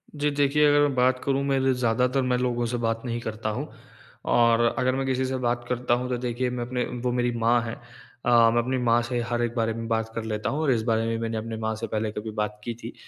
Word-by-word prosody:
जी। 150 0 +1
देखिए, 145 +1 +3
अगर 145 0 +5
मैं 145 -2 +2
बात 130 0 +3
करूँ 140 0 0
मेरे 135 -1 +2
ज़्यादातर 125 +2 +1
मैं 125 -1 +1
लोगों 120 -1 0
से 120 +1 -2
बात 115 0 0
नहीं 120 -1 -2
करता 110 -1 -4
हूँ। 105 - -3 0.7
और 115 -1 +4 0.2
अगर 130 +1 +1
मैं 135 0 -1
किसी 130 0 0
से 130 0 -2
बात 120 0 0
करता 125 -1 0
हूँ 125 +1 0
तो 125 - 0
देखिए 125 +1 -2
मैं 125 -1 -3
अपने 125 0 -2 0.2
वो 125 - +1
मेरी 120 0 +1
माँ 115 +1 +3
हैं। 115 0 -5
अ, 120 -1 +1
मैं 120 +1 +2
अपनी 130 +2 -1
माँ 120 0 +4
से 120 +1 -2
हर 120 0 0
एक 120 0 -2
बारे 115 -1 0
में 115 0 -5
बात 110 -1 -1
कर 115 - -3
लेता 110 -1 -2
हूँ 145 +3 -2
और 150 -4 +2
इस 115 -3 +2
बारे 115 -1 +1
में 115 0 -1
मैंने 115 -1 -2
अपनी 110 0 -4
माँ 110 0 -2
से 115 +1 -5
पहले 110 0 -2
कभी 110 +1 -5
बात 105 0 -2
की 120 - -3
थी। - - -6
120 Hz, 260 wpm, -25 LUFS, 115-125 Hz, 0.7 s, अगर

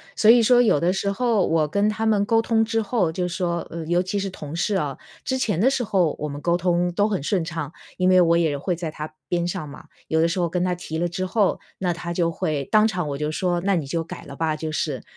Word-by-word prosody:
所 215 - +4
以 240 0 +6
说 245 +2 +5
有 215 -11 +3
的 175 +4 +2
时 200 +1 -1
候 230 -2 +1
我 160 -2 +2
跟 200 +7 +1
他 215 +1 -2
们 205 -2 +2
沟 225 +1 +3
通 225 0 +2
之 225 0 0
后， 200 -6 0
就 180 +2 -2
说， 175 -1 -2
呃， 165 -1 -6
尤 175 +2 +2
其 185 +3 -3
是 195 0 -2
同 150 -3 -8
事 200 +4 0
啊， 145 -7 -2 0.3
之 260 - -1
前 215 -9 0
的 240 +7 +4
时 270 -2 0
候 190 -8 +1
我 150 - -2
们 145 0 -7
沟 170 +2 +2
通 175 0 +1
都 205 +4 +2
很 205 -8 -1
顺 175 +4 0
畅， 160 -3 -5 0.3
因 185 0 +2
为 185 0 +6
我 170 -1 +4
也 160 -4 +1
会 175 +5 -2
在 170 -1 -4
他 155 0 -7 0.2
边 175 -1 0
上 155 -3 -4
嘛， - - -11 0.2
有 160 - +1
的 165 - +4
时 175 +3 -2
候 175 -1 +1
跟 180 +1 -1
他 180 0 +1
提 170 -2 -5
了 175 +2 0
之 180 +2 -4
后， 200 +1 +1 0.2
那 180 -2 0
他 170 0 -6
就 170 -1 +1
会 150 -3 -2
当 215 0 +5
场 180 -6 -2
我 140 - -3
就 150 +1 -2
说 175 +1 -1
那 195 +1 +1
你 160 -5 -1
就 165 +4 -2
改 165 - -9
了 140 - -9
吧， 160 +1 -1
就 155 0 -4
是， 150 -5 -2
175 Hz, 295 characters per minute, -23 LUFS, 160-200 Hz, 0.3 s, 以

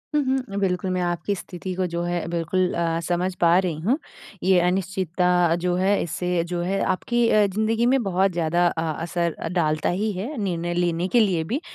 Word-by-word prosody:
हुँ, 295 - +4
हुँ। 260 -6 -1
बिल्कुल, 185 -1 0
मैं 185 0 0
आपकी 175 +2 -1
स्थिति 185 0 -6
को 185 0 0
जो 170 0 -3
है 175 -1 -2
बिल्कुल 175 +2 0
अ, 165 -1 0
समझ 180 +1 0
पा 170 +1 +5
रही 175 -4 -1
हूँ। 230 - +1 0.5
ये 185 -1 +4
अनिश्चितता 180 -1 +1
जो 180 -1 +1
है 195 +3 +2
इससे 175 +1 -1
जो 175 0 -3
है 195 +3 -1
आपकी 235 +5 +1
अ, 210 -1 +4
ज़िंदगी 220 +4 0
में 260 +1 +3
बहुत 190 0 +1
ज़्यादा 170 +1 +1
अ, 165 -1 -2 0.2
असर 170 0 -1 0.2
डालता 155 -3 +1
ही 210 +4 0
है 210 +11 -5
निर्णय 175 -2 -2
लेने 175 0 0
के 240 - +3
लिए 185 -7 +2
भी। 250 - -3
180 Hz, 195 wpm, -23 LUFS, 170-195 Hz, 0.5 s, पा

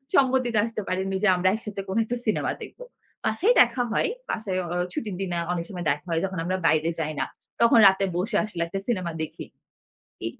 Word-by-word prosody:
সম্মতিতে 255 -4 +3
আসতে 225 -2 -4
পারিনি 190 +1 -1
যে, - - +5
আমরা 180 +1 +1
একসাথে 210 -3 -4
কোনো 195 +4 0
একটা 245 +2 -2
সিনেমা 215 - +1
দেখব। - - -12 0.5
বাসায় 370 - +3
দেখা 250 - +3
হয়। - - +1 0.2
বাসায় 195 -4 -2
অ - - -6 0.3
ছুটির 210 -1 -3
দিনে 180 -3 -2
অনেক 170 -1 -1
সময় 175 -4 -6
দেখা 150 +4 -3
হয়। 165 -1 +1
যখন 190 -2 -5
আমরা 185 +2 -1
বাইরে 155 +2 +3
যাই 155 -1 -2
না। - - +1 0.4
তখন 235 0 +6
রাতে 190 +1 +3
বসে 185 +6 -1
আসলে 205 -6 -5
একটা 195 +3 -4
সিনেমা 185 -8 -1
দেখি। 155 - -5 0.8
এই 115 - -2
195 Hz, 195 wpm, -25 LUFS, 175-225 Hz, 0.8 s, তখন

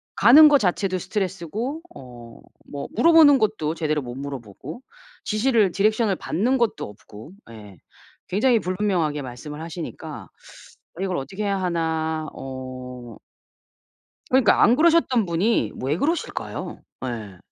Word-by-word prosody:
가는 280 +9 +8
거 295 -1 +6
자체도 185 0 0
스트레스고 205 - -4
어 120 -3 -12 0.3
뭐 140 -1 -6
물어보는 320 -4 +6
것도 205 -9 -1
제대로 155 -2 -1
못 120 -1 -8
물어보고 135 - -8 0.4
지시를 215 -3 +2
디렉션을 215 0 +1
받는 245 +12 0
것도 235 -3 0
없고 105 - -13 0.2
예 105 -4 -12 0.5
굉장히 225 +5 +2
불분명하게 180 -6 -1
말씀을 135 +4 -8
하시니까 165 0 -7 0.7
이걸 185 -2 -1
어떻게 195 +10 -5
해야 195 -1 -1
하나 160 -3 -1
어 130 -2 -8 1.1
그러니까요. 255 -4 +4
안 240 +3 +5
그러셨던 310 - +3
분이 170 - 0
왜 140 +4 0
그러실까요? 320 - -3 0.2
예. 110 -7 -6
175 Hz, 290 characters per minute, -23 LUFS, 135-220 Hz, 1.1 s, 가는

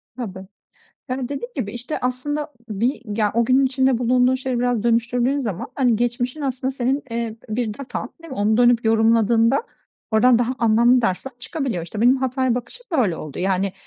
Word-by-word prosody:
Tabii. 190 -6 -7 0.6
Yani, 255 +1 -2
dediğim 260 -3 -5
gibi, 215 -7 -3
işte, 245 +5 -4
aslında 290 +4 -2 0.2
bir 230 +6 -1 0.2
ya, 210 -2 +2
o 235 +1 +3
günün 260 +3 +4
içinde 260 -1 +2
bulunduğun 250 +1 +3
şeyleri 260 -1 -2
biraz 245 -3 +1
dönüştürdüğün 240 +3 +1
zaman, 215 -10 -3
hani, 245 -5 +2
geçmişin 245 +4 -1
aslında 260 -2 -2
senin, 265 +2 -1
eee, 230 -1 -3
bir 215 -1 -2
datan, 275 +3 -6
değil 330 - -11
mi? 265 - -6
Onu 210 +2 +2
dönüp 240 -1 +4
yorumladığında 225 - +3 0.5
oradan 235 +2 +5
daha 245 +2 0
anlamlı 235 +2 +4
dersler 205 +6 -1
çıkabiliyor. 260 - -3
İşte, 205 +5 -6
benim 245 +3 +5
hataya 260 -1 0
bakışım 250 - -7
böyle 225 - +2
oldu. 155 -3 -8
Yani, 190 +1 0
245 Hz, 175 wpm, -22 LUFS, 225-260 Hz, 0.6 s, oradan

